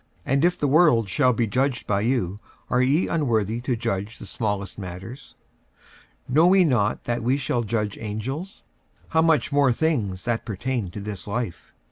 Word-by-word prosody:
and 135 +3 +1
if 175 +1 +3
the 145 - 0
world 140 - +4
shall 110 +7 +3
be 115 0 +1
judged 130 +4 0
by 100 -1 0
you, 105 -5 0 0.3
are 125 - +3
ye 140 +7 +2
unworthy 115 - 0
to 125 0 -1
judge 110 -2 -3
the - - -9
smallest 105 -3 -3
matters? 95 +8 -8 0.9
46:006:003 125 - -6
Know 170 +6 +6
ye 190 - +6
not 120 -9 +1
that 120 0 -2
we 125 +4 +1
shall 130 -3 -1
judge 105 -2 -2
angels? 130 - -5 0.5
how 160 - +3
much 160 -5 +2
more 140 -2 +4
things 115 - -1
that 120 -2 -1
pertain 110 0 -3
to 95 - -7
this 100 -2 -6
life? 105 -3 -4
120 Hz, 175 wpm, -24 LUFS, 105-140 Hz, 0.9 s, Know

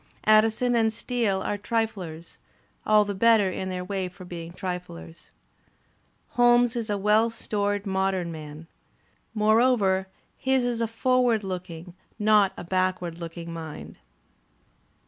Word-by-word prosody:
Addison 220 +3 +4
and 225 -1 +3
Steele 225 -4 -1
are 205 - -2
triflers, 195 -7 -4 0.5
all 215 -1 +5
the 205 - -3
better 210 -1 +4
in 190 +1 -4
their 180 -1 -4
way 190 -1 -2
for 185 +1 -13
being 170 -1 -7
triflers. 175 - -7 1.0
Holmes 240 -1 +4
is 230 -2 -3
a 205 - 0
well 210 +3 +3
stored 205 -2 -2
modern 190 -2 -1
man. 155 0 -9 0.7
More 215 +1 +4
over 195 -7 +2 0.3
his 265 -1 +1
is 240 -1 -1
a 230 - +1
foreward 240 -1 +1
looking, 180 -2 -6 0.2
not 210 -2 +4
a - - -6
backward 185 -1 -1
looking 170 0 -7
mind. 160 -2 -8
200 Hz, 130 wpm, -26 LUFS, 180-225 Hz, 1.0 s, all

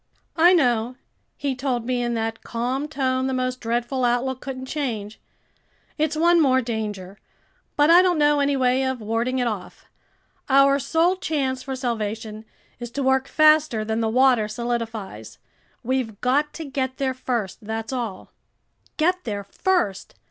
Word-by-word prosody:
"I 345 +2 +6
know," 245 -6 +2 0.4
he 275 -2 -2
told 250 -3 -2
me 250 0 -1
in 240 -1 -1
that 225 0 -3
calm 250 +5 -3
tone 260 -3 -1
the 265 - -1
most 255 0 -2
dreadful 240 +3 -1
outlook 245 +2 0
couldn't 260 -1 -6
change. 230 -8 -4 0.7
"It's 310 0 0
one 340 +2 +4
more 260 -3 +4
danger, 210 -5 -5 0.6
but 295 +2 +5
I 350 +2 +8
don't 360 -2 +2
know 295 -1 +3
any 280 0 +1
way 255 0 +2
of 260 -1 -2
warding 230 +4 -1
it 250 - +1
off. 210 -6 -5 0.6
Our 275 +1 +5
sole 335 +7 +1
chance 275 -7 -2
for 265 0 -5
salvation 220 -3 -4 0.3
is 240 -1 -6
to 275 +4 -3
work 265 0 +2
faster 305 -7 +4
than 220 +1 -1
the 225 - +1
water 250 -2 +3
solidifies. 225 - -5 0.5
We've 240 -4 -2
got 285 +4 +1
to 325 - -7
get 260 -2 -3
there 265 -1 0
first, 240 -6 -3
that's 225 +3 -4
all." 230 -7 -5 0.7
Get 360 +3 +1
there 205 -3 -4
first! 205 - -1
255 Hz, 155 wpm, -23 LUFS, 225-280 Hz, 0.7 s, I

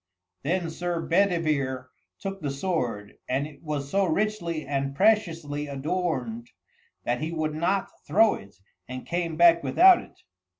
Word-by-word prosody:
Then 170 +2 -1
Sir 175 +1 -2
Bedivere 155 -8 +1 0.3
took 195 0 -6
the 145 - -2
sword, 135 - -3
and 135 +3 0
it 145 -2 -12
was 145 -3 -4
so 200 0 +3
richly 170 -3 -1
and 140 0 -2
preciously 165 -8 +1
adorned 135 -6 -2 0.5
that 120 +2 -1
he 160 +2 -2
would 155 -2 -2
not 185 +5 0 0.2
throw 220 +2 +5
it, 100 +1 -10 0.3
and 130 0 -7
came 170 -2 -2
back 170 0 +6
without 370 0 +6
it. - - -17
160 Hz, 140 wpm, -26 LUFS, 140-180 Hz, 0.5 s, back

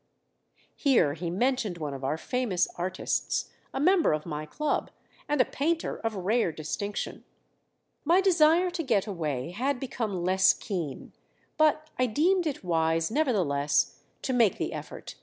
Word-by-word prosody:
Here 255 - +3
he 170 +2 -4
mentioned 215 -1 0
one 150 -3 -4
of 135 -1 -7
our 140 +4 0
famous 230 -2 0
artists, 185 +1 -2 0.2
a - - -3
member 345 - +4
of 155 0 -2
my 155 -2 -5
club, 300 - -1 0.4
and 295 -1 +1
a 255 - +6
painter 325 +4 -1
of 225 -1 -3
rare 195 +1 +1
distinction. 160 +7 -4 0.8
My 340 +5 +4
desire 355 -1 +4
to 350 -1 -3
get 225 - +1
away 155 - -3
had 255 +7 -1
become 220 -8 -3
less 190 +1 +5
keen; 170 -9 -5 0.4
but 310 0 +3
I 255 - +3
deemed 340 - +2
it 285 - -4
wise 165 0 +1
nevertheless 160 - +1 0.2
to 260 - -1
make 230 -5 +3
the - - -3
effort. - - -8
215 Hz, 150 wpm, -28 LUFS, -, 0.8 s, a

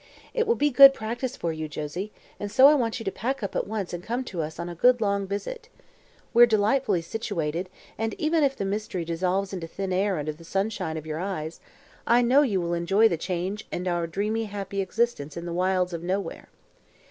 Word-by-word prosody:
It 475 -1 +1
will 465 - +3
be 290 0 +2
good 275 +2 +9
practice 235 +3 -4
for 165 -1 -2
you, 155 0 -4
Josie, 155 +7 -5 0.3
and 205 0 -4
so 260 +5 +7
I 295 - +7
want 240 -6 0
you 225 - -7
to 195 - 0
pack 255 +4 -3
up 200 - -4
at - - -1
once 205 -4 -4
and 175 - -4
come 240 +5 -2
to 185 -9 -4
us 155 +1 -5
on 170 - -4
a 175 - -5
good 245 +8 +4
long 200 -2 0
visit. 450 - -5 0.6
We're 240 0 +8
delightfully 215 -3 +2
situated 170 -3 -3 0.3
and, 225 0 -1
even 315 0 +1
if 275 -1 +2
the 200 - -3
mystery 195 -3 -3
dissolves 185 +4 -1
into 175 -3 -4
thin 190 +2 -4
air 190 0 +1
under 155 +1 -3
the 160 +3 -15
sunshine 195 -2 -2
of 155 - -7
your 155 0 -4
eyes, 170 -4 -4 0.5
I 240 +1 +5
know 255 +4 +5
you 215 -10 +1
will 170 -1 -2
enjoy 195 +6 +3
the - - 0
change 185 +4 -3
and 180 +1 -3
our 175 -1 0
dreamy, 210 +6 -1
happy 200 -1 -4
existence 190 -7 -1
in 170 - -5
the 170 - -4
wilds 180 0 +1
of 170 - -4
nowhere. 185 0 -3
195 Hz, 220 wpm, -26 LUFS, 170-225 Hz, 0.6 s, good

